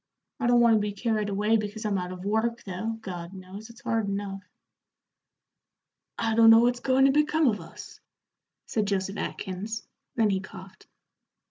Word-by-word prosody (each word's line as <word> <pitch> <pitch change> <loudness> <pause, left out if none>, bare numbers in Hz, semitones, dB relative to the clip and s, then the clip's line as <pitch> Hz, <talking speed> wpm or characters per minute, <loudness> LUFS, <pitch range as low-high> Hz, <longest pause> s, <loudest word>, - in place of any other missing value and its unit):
I 235 - 0
don't 240 0 +5
want 235 -1 +6
to - - +2
be 205 0 -2
carried 215 0 -1
away 210 +3 +2
because 215 +1 -5
I'm 200 -2 0
out 180 0 -5
of 185 +1 -8
work, 225 +3 0
though, 215 +4 -4
God 180 -2 -7
knows, 190 +4 -10
it's 230 0 -15
hard 225 -3 -1
enough." 200 -1 -4 1.8
"I 225 -1 0
don't 225 0 +7
know 225 - +9
what's 245 +1 +3
goin' 265 +1 +3
to 275 - +5
become 300 +2 +2
of 210 -6 +1
us," 165 - -12 0.7
said 215 -2 -1
Joseph 195 0 -1
Atkins 210 +4 -5 0.3
then 220 -3 +3
he 190 - +1
coughed. 190 0 -12
210 Hz, 170 wpm, -27 LUFS, 195-230 Hz, 1.8 s, know